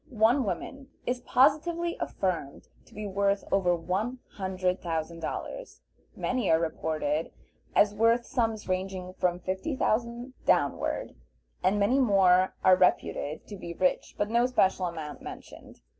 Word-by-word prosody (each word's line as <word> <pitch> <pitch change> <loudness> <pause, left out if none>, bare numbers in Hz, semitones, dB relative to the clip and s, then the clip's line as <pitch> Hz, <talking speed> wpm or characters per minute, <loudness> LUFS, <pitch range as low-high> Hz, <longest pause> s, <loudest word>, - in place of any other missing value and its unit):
One 235 +2 +3
woman 270 +9 -5 0.2
is 250 0 -1
positively 320 +7 +2
affirmed 170 -7 -3 0.2
to - - -19
be 210 0 -5
worth 200 0 +1
over 180 -3 +3
one 190 +9 -2
hundred 185 -1 -2
thousand 165 0 -3
dollars, - - -6 0.3
many 250 -5 -1
are 160 - +5
reported 160 -1 -1 0.4
as 205 0 +5
worth 230 +3 +3
sums 225 -3 -1
ranging 185 0 -3
from 180 -1 0
fifty 190 - -3
thousand 235 +2 -1
downward, 140 -2 +1 0.5
and 195 +3 +2
many 240 +7 +3
more 190 -6 +4
are 185 0 +7
reputed 160 -4 +1
to 205 - -8
be 170 -3 -7
rich, 180 +1 0
but 205 +1 -1
no 240 +1 +3
special 190 -7 +2
amount 160 -3 -6
mentioned. - - -11
195 Hz, 140 wpm, -28 LUFS, 180-235 Hz, 0.5 s, are